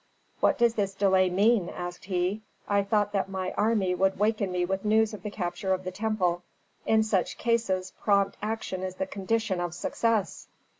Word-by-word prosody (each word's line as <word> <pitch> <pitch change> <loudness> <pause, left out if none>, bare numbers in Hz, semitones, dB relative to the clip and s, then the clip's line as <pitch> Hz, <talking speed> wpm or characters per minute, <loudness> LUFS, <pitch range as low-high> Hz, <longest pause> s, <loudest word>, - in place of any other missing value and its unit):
"What - - +3
does 235 -1 +3
this 200 -3 -1
delay 190 -2 +3
mean?" 200 +1 +3
asked 175 0 -7
he. 185 +2 -1 0.3
"I 200 0 +3
thought 205 0 +1
that 195 -1 -1
my 185 -1 -3
army 210 -4 +1
would 190 +1 +1
waken 210 -1 +1
me 180 -1 0
with 190 +1 -2
news 220 +1 +3
of 210 - -7
the 210 - -4
capture 190 -1 -2
of 185 - -8
the 185 - -4
temple. 185 -4 0 0.5
In 220 0 +4
such 200 -5 0
cases 195 -6 0
prompt 200 -1 +2
action 210 -3 -3
is 185 -1 -4
the 190 - -2
condition 195 -1 -1
of 175 -1 -3
success." 220 0 -1
195 Hz, 185 wpm, -27 LUFS, 185-215 Hz, 0.5 s, In